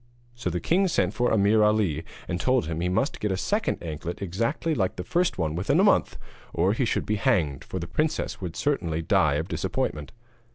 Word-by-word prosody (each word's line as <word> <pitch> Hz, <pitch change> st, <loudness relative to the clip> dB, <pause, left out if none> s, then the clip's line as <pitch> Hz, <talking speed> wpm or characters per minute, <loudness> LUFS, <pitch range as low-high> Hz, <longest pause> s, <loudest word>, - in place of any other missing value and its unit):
So 120 Hz, -6 st, -3 dB
the 90 Hz, 0 st, -2 dB
king 190 Hz, -, +2 dB
sent 95 Hz, -, +1 dB
for 120 Hz, +1 st, +1 dB
Ameer 105 Hz, 0 st, +4 dB
Ali 105 Hz, -8 st, +2 dB, 0.2 s
and 90 Hz, 0 st, -2 dB
told 130 Hz, 0 st, +2 dB
him 80 Hz, 0 st, -3 dB
that 85 Hz, -, -1 dB
he -, -, +1 dB
must 110 Hz, +10 st, 0 dB
get 105 Hz, -, -1 dB
a 95 Hz, -, 0 dB
second 210 Hz, -, -1 dB
anklet 85 Hz, +1 st, -5 dB
exactly 115 Hz, -, -1 dB
like 95 Hz, -10 st, 0 dB
the 90 Hz, -, -5 dB
first 175 Hz, -, 0 dB
within 85 Hz, +2 st, 0 dB
a -, -, +5 dB
month, -, -, +3 dB, 0.4 s
or 90 Hz, +4 st, +2 dB
he 125 Hz, +3 st, 0 dB
should -, -, -1 dB
be 105 Hz, -, 0 dB
hanged, 90 Hz, -, +1 dB
for -, -, -6 dB
the 85 Hz, -, -3 dB
princess 110 Hz, -, -2 dB
would 90 Hz, -3 st, -5 dB
certainly 85 Hz, -, -1 dB
die 75 Hz, -2 st, +3 dB
of 80 Hz, +3 st, -2 dB
disappointment. 75 Hz, -5 st, -2 dB
95 Hz, 210 wpm, -26 LUFS, 85-120 Hz, 0.4 s, a